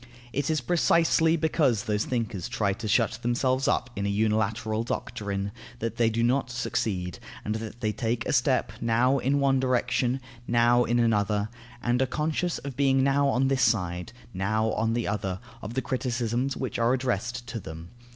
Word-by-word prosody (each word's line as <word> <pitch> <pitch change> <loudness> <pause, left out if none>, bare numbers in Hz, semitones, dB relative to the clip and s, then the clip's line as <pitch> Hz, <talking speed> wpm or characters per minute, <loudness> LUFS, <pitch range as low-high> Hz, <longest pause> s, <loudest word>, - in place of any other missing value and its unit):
It 140 +4 -1
is 155 -3 +1
precisely 165 +2 +3
because 145 -9 +2
those 105 0 0
thinkers 115 -5 -2
try 110 -5 0
to 110 +3 -6
shut 110 +1 +2
themselves 130 +2 +1
up 125 0 +1
in 100 0 -1
a - - 0
unilateral 110 +1 0
doctrine, 100 -4 -3 0.3
that 115 0 -4
they 115 -1 +3
do 115 +1 0
not 125 +2 +2
succeed, 100 -7 -2 0.3
and 105 - -1
that 110 +2 -6
they 110 -2 +1
take 115 +1 -2
a - - -1
step, 130 0 +2
now 120 +4 +3
in 140 +3 +1
one 135 -1 +3
direction, 125 0 +1 0.3
now 120 +1 +4
in 120 - +1
another, 105 -2 +1 0.3
and 120 +1 +2
are 130 - +2
conscious 155 +5 -1
of 140 -2 -7
being 135 -1 +3
now 140 +1 +3
on 135 -1 +2
this 135 -1 +1
side, 90 -4 +1 0.2
now 110 +4 0
on 110 +2 0
the 120 0 -1
other, 95 -3 -2 0.2
of 110 +3 -6
the 130 - 0
criticisms 125 0 -1
which 130 - -3
are 115 +2 +3
addressed 120 -1 -2
to 115 -1 -5
them. 80 -2 -9
120 Hz, 180 wpm, -27 LUFS, 110-130 Hz, 0.3 s, now